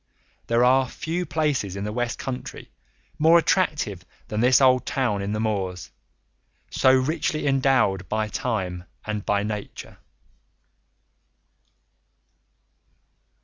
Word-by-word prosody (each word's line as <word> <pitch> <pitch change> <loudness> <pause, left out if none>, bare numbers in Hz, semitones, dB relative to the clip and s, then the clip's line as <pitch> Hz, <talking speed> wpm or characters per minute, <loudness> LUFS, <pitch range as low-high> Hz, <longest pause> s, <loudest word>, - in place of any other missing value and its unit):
There 115 +1 +3
are 130 +1 +4
few 170 +5 -4
places 145 - -1
in 100 - -4
the 105 0 -4
West 120 0 -2
Country 130 -2 -7 0.5
more 160 +2 +6
attractive 150 - 0 0.3
than 105 - -2
this 125 +1 +5
old 130 -2 +4
town 120 -7 -1
in 100 +1 -3
the 105 - -2
moors, 95 -5 -3 0.8
so 130 - +4
richly 155 +4 0
endowed 130 -9 +2
by 110 0 -1
time 95 -6 -3 0.2
and 105 -1 -3
by 100 -1 0
nature. 105 -1 -6
120 Hz, 110 wpm, -24 LUFS, 105-135 Hz, 0.8 s, more